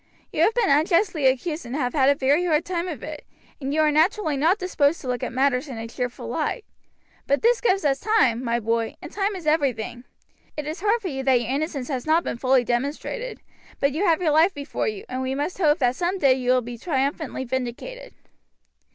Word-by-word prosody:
You -, -, 0 dB
have 450 Hz, -, +4 dB
been 475 Hz, -11 st, +2 dB
unjustly 330 Hz, 0 st, +3 dB
accused 300 Hz, +5 st, 0 dB
and 240 Hz, +2 st, -6 dB
have 250 Hz, -4 st, -1 dB
had 275 Hz, -2 st, +4 dB
a 285 Hz, -, +4 dB
very 280 Hz, +5 st, +2 dB
hard 320 Hz, -1 st, +1 dB
time 355 Hz, -1 st, -2 dB
of 310 Hz, -9 st, -6 dB
it, 305 Hz, -1 st, -7 dB, 0.4 s
and 275 Hz, -1 st, -3 dB
you 310 Hz, +2 st, +2 dB
are 305 Hz, -1 st, +4 dB
naturally 320 Hz, +1 st, +2 dB
not 325 Hz, +8 st, +3 dB
disposed 335 Hz, -5 st, +1 dB
to 265 Hz, -, -8 dB
look 250 Hz, -1 st, -2 dB
at -, -, -3 dB
matters 260 Hz, +2 st, +1 dB
in 255 Hz, -4 st, -7 dB
a 225 Hz, 0 st, -5 dB
cheerful 245 Hz, +1 st, -5 dB
light; 455 Hz, -, -2 dB, 0.6 s
but 280 Hz, +7 st, +1 dB
this 475 Hz, 0 st, +3 dB
gives 390 Hz, -7 st, +1 dB
us 275 Hz, -1 st, +2 dB
time, 260 Hz, -, +2 dB
my 235 Hz, -1 st, 0 dB
boy, 230 Hz, 0 st, -1 dB
and -, -, -10 dB
time 400 Hz, 0 st, -1 dB
is 360 Hz, -4 st, -8 dB
everything. 265 Hz, -6 st, 0 dB, 0.5 s
It 300 Hz, -, -3 dB
is 310 Hz, +3 st, -5 dB
hard 430 Hz, +3 st, +1 dB
for -, -, -2 dB
you 270 Hz, -3 st, -4 dB
that 260 Hz, -2 st, +4 dB
your 240 Hz, +1 st, -3 dB
innocence 280 Hz, -2 st, -2 dB
has 260 Hz, -1 st, -3 dB
not 325 Hz, +2 st, +3 dB
been -, -, -3 dB
fully 260 Hz, -1 st, +3 dB
demonstrated, 285 Hz, -, -3 dB, 0.4 s
but 280 Hz, -, +2 dB
you 315 Hz, +8 st, -2 dB
have 335 Hz, -1 st, +2 dB
your 315 Hz, -, +3 dB
life 325 Hz, +5 st, +4 dB
before 285 Hz, 0 st, -3 dB
you, 425 Hz, -1 st, -4 dB
and 255 Hz, -, -4 dB
we 260 Hz, 0 st, -2 dB
must 295 Hz, +7 st, -3 dB
hope 305 Hz, -3 st, +4 dB
that 250 Hz, -4 st, +1 dB
some 360 Hz, +4 st, -1 dB
day 275 Hz, -7 st, +4 dB
you 255 Hz, -1 st, -2 dB
will 255 Hz, 0 st, +4 dB
be 240 Hz, 0 st, -8 dB
triumphantly 275 Hz, -1 st, -2 dB
vindicated." 260 Hz, -, -5 dB
290 Hz, 225 wpm, -24 LUFS, 255-345 Hz, 0.6 s, have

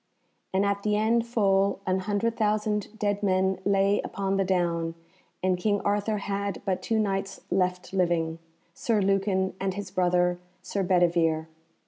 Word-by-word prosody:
And 190 Hz, +1 st, +2 dB
at 200 Hz, 0 st, 0 dB
the 210 Hz, 0 st, +1 dB
end 230 Hz, +2 st, +2 dB
full 200 Hz, -4 st, +2 dB
an 185 Hz, 0 st, +1 dB
hundred 205 Hz, +4 st, -1 dB
thousand 210 Hz, 0 st, -1 dB
dead 205 Hz, -1 st, 0 dB
men 190 Hz, -1 st, +1 dB
lay 200 Hz, 0 st, +3 dB
upon 195 Hz, 0 st, -2 dB
the 195 Hz, -, +2 dB
down, 170 Hz, -3 st, 0 dB, 0.5 s
and 185 Hz, -1 st, +1 dB
King 205 Hz, +2 st, +1 dB
Arthur 205 Hz, +1 st, 0 dB
had 200 Hz, -1 st, -3 dB
but 185 Hz, -2 st, -1 dB
two 225 Hz, -, 0 dB
Knights 195 Hz, -2 st, -1 dB
left 180 Hz, 0 st, 0 dB
living, 170 Hz, -3 st, 0 dB, 0.3 s
Sir 235 Hz, -5 st, 0 dB
Lucan 195 Hz, -1 st, +1 dB
and 190 Hz, -1 st, -2 dB
his 200 Hz, -2 st, -6 dB
brother 180 Hz, -1 st, +2 dB, 0.2 s
Sir 200 Hz, -, -2 dB
Bedivere. 170 Hz, -3 st, +2 dB
195 Hz, 150 wpm, -27 LUFS, 185-205 Hz, 0.5 s, lay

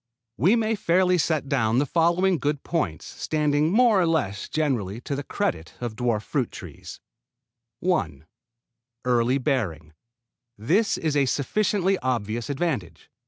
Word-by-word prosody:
We 185 Hz, -, +4 dB
may 225 Hz, -1 st, +1 dB
fairly 180 Hz, -3 st, +2 dB
set 155 Hz, -3 st, 0 dB
down 115 Hz, -4 st, +1 dB
the 140 Hz, -, +3 dB
following 170 Hz, +4 st, +2 dB
good 145 Hz, +1 st, -1 dB
points 95 Hz, -, -2 dB
standing 150 Hz, 0 st, 0 dB
more 225 Hz, -2 st, +4 dB
or 170 Hz, -, +2 dB
less 105 Hz, -12 st, -1 dB
generally 120 Hz, -10 st, -1 dB
to 140 Hz, -, -3 dB
the 140 Hz, -, -3 dB
credit 160 Hz, -, -3 dB
of 120 Hz, -3 st, -4 dB
dwarf 115 Hz, -3 st, 0 dB
fruit 130 Hz, -5 st, -1 dB
trees: -, -, -10 dB, 0.8 s
1. 80 Hz, -, -1 dB, 0.8 s
Early 125 Hz, +1 st, +2 dB
bearing. 100 Hz, -, -2 dB, 0.6 s
This 180 Hz, -, +1 dB
is 155 Hz, -2 st, -1 dB
a 140 Hz, -2 st, +3 dB
sufficiently 195 Hz, +7 st, +1 dB
obvious 115 Hz, -2 st, -2 dB
advantage. 130 Hz, -, -3 dB
145 Hz, 135 wpm, -25 LUFS, 115-175 Hz, 0.8 s, We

